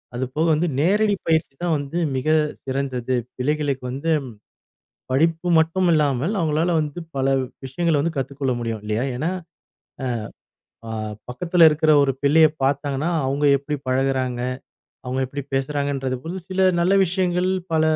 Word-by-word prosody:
அதுபோக 130 Hz, +6 st, -1 dB
வந்து 160 Hz, +3 st, +1 dB
நேரடி 205 Hz, +6 st, +3 dB
பயிற்சி 160 Hz, -3 st, +1 dB
தான் 175 Hz, -2 st, +1 dB
வந்து 145 Hz, +4 st, -5 dB, 0.2 s
மிகச் 155 Hz, +4 st, +2 dB, 0.2 s
சிறந்தது. 130 Hz, -2 st, -2 dB, 0.2 s
பிள்ளைகளுக்கு 140 Hz, 0 st, -1 dB
வந்து 140 Hz, +6 st, -2 dB, 1.0 s
படிப்பு 165 Hz, +5 st, +1 dB
மட்டுமில்லாமல், 160 Hz, -, +2 dB
அவங்களால 165 Hz, +1 st, +1 dB
வந்து 150 Hz, +2 st, -3 dB, 0.2 s
பல 135 Hz, -, 0 dB, 0.4 s
விஷயங்களைக் 160 Hz, +2 st, 0 dB
கத்துக்கொள்ள 135 Hz, 0 st, -2 dB
முடியும். 115 Hz, -2 st, -3 dB
இல்லையா? 110 Hz, +3 st, -1 dB
ஏனா, 155 Hz, +8 st, -1 dB, 1.6 s
அ -, -, -5 dB
ஆஹ் 110 Hz, -1 st, -4 dB
பக்கத்துல 165 Hz, +6 st, +4 dB
இருக்கிற 155 Hz, +1 st, +2 dB
ஒரு 135 Hz, -1 st, +2 dB
பிள்ளையப் 155 Hz, +1 st, +5 dB
பாத்தாங்கன்னா, 140 Hz, +3 st, 0 dB, 0.2 s
அவுங்க 140 Hz, +2 st, +1 dB
எப்படி 150 Hz, +2 st, -4 dB
பழகுறாங்க? 130 Hz, -1 st, 0 dB, 0.7 s
அவுங்க 130 Hz, +1 st, -1 dB
எப்படி 140 Hz, +2 st, -5 dB
பேசுறாங்கன்றத 135 Hz, -1 st, -1 dB
புதுசுல 175 Hz, +1 st, -6 dB
சில 185 Hz, 0 st, +3 dB
நல்ல 185 Hz, +3 st, +3 dB
விஷயங்கள், 180 Hz, 0 st, 0 dB, 0.2 s
பல 160 Hz, -, +3 dB
145 Hz, 125 wpm, -22 LUFS, 130-165 Hz, 1.6 s, பிள்ளையப்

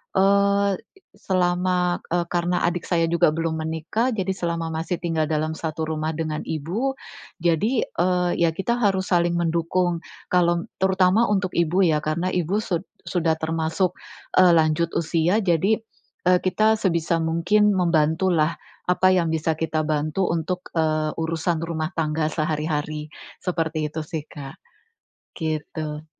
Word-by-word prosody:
eee 200 Hz, +1 st, +3 dB
e 390 Hz, -, -24 dB, 0.2 s
selama, 180 Hz, -1 st, 0 dB
eee, 175 Hz, 0 st, +1 dB
karena 175 Hz, 0 st, 0 dB
adik 175 Hz, 0 st, -1 dB
saya 170 Hz, -2 st, +2 dB
juga 170 Hz, -2 st, +4 dB
belum 165 Hz, -1 st, -1 dB
menikah, 160 Hz, +10 st, -1 dB
jadi 190 Hz, -2 st, -1 dB
selama 170 Hz, -3 st, -3 dB
masih 165 Hz, +3 st, -2 dB
tinggal 165 Hz, -3 st, -1 dB
dalam 155 Hz, 0 st, 0 dB
satu 160 Hz, 0 st, -3 dB
rumah 155 Hz, 0 st, -2 dB
dengan 155 Hz, -1 st, -2 dB
ibu, 185 Hz, -, -2 dB, 0.5 s
jadi, 205 Hz, +9 st, +2 dB
eee, 180 Hz, 0 st, 0 dB
ya 170 Hz, -, +5 dB
kita 235 Hz, +7 st, -1 dB
harus 195 Hz, -4 st, +1 dB
saling 175 Hz, 0 st, +2 dB
mendukung. 170 Hz, +1 st, 0 dB, 0.3 s
Kalau 175 Hz, 0 st, +3 dB, 0.2 s
terutama 190 Hz, +4 st, +3 dB
untuk 190 Hz, -3 st, 0 dB
ibu 170 Hz, +3 st, +2 dB
ya, 155 Hz, -3 st, +3 dB
karena 170 Hz, +5 st, -1 dB
ibu 180 Hz, +3 st, 0 dB
sud 175 Hz, -5 st, -1 dB, 0.2 s
sudah 165 Hz, -3 st, 0 dB
termasuk, 160 Hz, +3 st, 0 dB, 0.5 s
eee, 185 Hz, -1 st, +7 dB
lanjut 160 Hz, +1 st, +2 dB
usia. 165 Hz, +3 st, +1 dB
Jadi, 190 Hz, +4 st, +2 dB, 0.5 s
eee, 180 Hz, 0 st, +5 dB
kita 215 Hz, +4 st, +3 dB
sebisa 170 Hz, -3 st, +1 dB
mungkin 170 Hz, +6 st, +3 dB
membantulah, 165 Hz, -1 st, +2 dB, 0.3 s
apa 185 Hz, +1 st, +4 dB
yang 175 Hz, -3 st, +2 dB
bisa 160 Hz, 0 st, 0 dB
kita 160 Hz, -1 st, -1 dB
bantu 155 Hz, +4 st, 0 dB
untuk, 170 Hz, +2 st, -2 dB
eee, 155 Hz, -1 st, +1 dB
urusan 165 Hz, +1 st, -1 dB
rumah 160 Hz, -1 st, -2 dB
tangga 155 Hz, -1 st, 0 dB
sehari-hari. 155 Hz, -1 st, -2 dB, 0.4 s
Seperti 160 Hz, -3 st, -1 dB
itu 160 Hz, -, -3 dB
sih, 155 Hz, -1 st, -4 dB
Kak. 140 Hz, -2 st, -9 dB, 0.8 s
Gitu. 155 Hz, -1 st, -4 dB
170 Hz, 140 wpm, -23 LUFS, 160-185 Hz, 0.8 s, eee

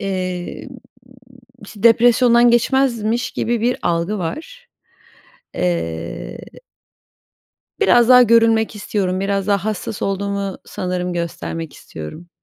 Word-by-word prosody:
Emm, 185 Hz, +2 st, -4 dB, 1.0 s
iş -, -, -12 dB
depresyondan 235 Hz, +2 st, +5 dB
geçmezmiş 240 Hz, -1 st, +1 dB
gibi 235 Hz, 0 st, -2 dB
bir 245 Hz, +2 st, +1 dB
algı 170 Hz, +5 st, -1 dB
var, 405 Hz, -, -6 dB, 0.9 s
eee 85 Hz, -, -3 dB, 1.4 s
biraz 240 Hz, -, +4 dB
daha 250 Hz, 0 st, +8 dB
görünmek 225 Hz, -1 st, +3 dB
istiyorum, 190 Hz, -2 st, -2 dB
biraz 195 Hz, 0 st, -1 dB
daha 200 Hz, -1 st, +1 dB
hassas 215 Hz, +1 st, -4 dB
olduğumu 200 Hz, 0 st, -2 dB
sanırım 180 Hz, -1 st, -3 dB
göstermek 165 Hz, -1 st, -5 dB
istiyorum. 120 Hz, -, -10 dB
200 Hz, 95 wpm, -19 LUFS, 180-235 Hz, 1.4 s, daha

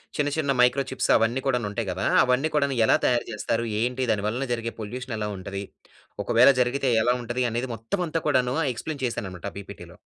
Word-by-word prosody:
చిన్న, 145 Hz, -1 st, +1 dB
చిన్న 145 Hz, -3 st, 0 dB
micro 125 Hz, +3 st, +4 dB
chips 130 Hz, -, -2 dB
అవన్నీ 115 Hz, +4 st, +2 dB
కూడనుంటాయి 115 Hz, -4 st, -1 dB
కదా! -, -, -3 dB, 0.2 s
అవన్నీ 130 Hz, +5 st, +1 dB
కూడాను 140 Hz, -2 st, +1 dB
ఎలా -, -, +5 dB
తయారు 120 Hz, -1 st, +2 dB
చేస్తారు? 115 Hz, +2 st, -1 dB, 0.2 s
ఏంటి? 125 Hz, +2 st, -1 dB
దాని 100 Hz, -2 st, 0 dB
వలన 125 Hz, +5 st, -2 dB
జరిగే 115 Hz, 0 st, -3 dB
పొల్యూషన్ 120 Hz, +3 st, -5 dB
ఎలా 105 Hz, -1 st, -2 dB
ఉంటది? 100 Hz, +1 st, -5 dB, 0.6 s
ఒకవేళ 120 Hz, +6 st, +6 dB
జరిగితే 130 Hz, +2 st, +1 dB
ఎలా 125 Hz, +1 st, +3 dB
ఉంటది? 120 Hz, +2 st, -2 dB
అనేది 120 Hz, +3 st, -2 dB
మొత్తం 115 Hz, -, -3 dB
అంతా 165 Hz, +1 st, -2 dB
కూడాను 130 Hz, -3 st, +2 dB, 0.2 s
ఎక్స్‌ప్లైన్ 140 Hz, +3 st, -6 dB
చేశాను 120 Hz, -4 st, -3 dB
అన్నమాట 90 Hz, +2 st, -7 dB
ఆ -, -, -24 dB
పీపీటీ‌లో. 100 Hz, -, -11 dB
125 Hz, 190 wpm, -25 LUFS, 115-130 Hz, 0.6 s, ఒకవేళ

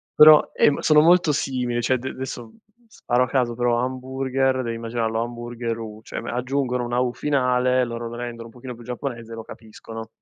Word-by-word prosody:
però, 150 Hz, 0 st, +9 dB, 0.2 s
uhm, 145 Hz, -, +4 dB
sono 150 Hz, -1 st, +5 dB
molto 170 Hz, 0 st, +5 dB
simili, 125 Hz, -4 st, -1 dB
cioè 130 Hz, -, +1 dB
ad 130 Hz, -, +1 dB
d 130 Hz, -, -4 dB
adesso, 120 Hz, -3 st, -7 dB, 0.3 s
sparo 125 Hz, -, 0 dB
a -, -, -1 dB
caso, 125 Hz, -2 st, 0 dB
però, 120 Hz, 0 st, +1 dB
hamburger, 130 Hz, +1 st, -1 dB
devi 115 Hz, -1 st, -3 dB
immaginarlo 115 Hz, -1 st, -2 dB
hamburgeru, 115 Hz, -2 st, -5 dB
cioè -, -, -8 dB
aggiungono 125 Hz, 0 st, -1 dB
una 120 Hz, +1 st, -1 dB
"U" 125 Hz, -1 st, 0 dB
finale, 125 Hz, -3 st, +1 dB
loro 115 Hz, 0 st, -5 dB
lo 115 Hz, -, -7 dB
rendono 120 Hz, -1 st, -6 dB
un 115 Hz, -, -16 dB
pochino 125 Hz, 0 st, -8 dB
più 120 Hz, -, -13 dB
giapponese 120 Hz, -1 st, -6 dB
e 115 Hz, -, -6 dB
lo 115 Hz, -, -7 dB
capiscono. 110 Hz, 0 st, -10 dB
125 Hz, 190 wpm, -23 LUFS, 115-130 Hz, 0.3 s, però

